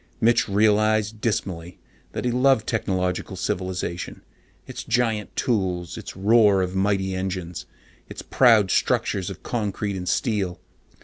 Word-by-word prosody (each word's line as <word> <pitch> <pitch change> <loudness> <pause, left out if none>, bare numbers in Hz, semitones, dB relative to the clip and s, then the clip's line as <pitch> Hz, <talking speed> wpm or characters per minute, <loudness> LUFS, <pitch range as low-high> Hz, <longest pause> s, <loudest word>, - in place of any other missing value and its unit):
Mitch 115 -1 +3
realized 110 +1 +2
dismally 90 -6 -3 0.4
that - - -4
he 125 - +1
loved 125 -2 +3
technological 95 -3 -2
civilization, 90 -1 -4 0.4
its 130 - -7
giant 115 -3 -1
tools, 90 -7 -1
its - - -8
roar 100 -1 +4
of 90 0 -3
mighty 95 -1 0
engines, 95 -2 -4 0.4
its - - -8
proud 110 -7 +4
structures 95 -2 0
of 95 - -9
concrete 105 -3 -2
and 90 -1 -4
steel. 100 -7 -1
100 Hz, 125 wpm, -24 LUFS, 95-110 Hz, 0.4 s, roar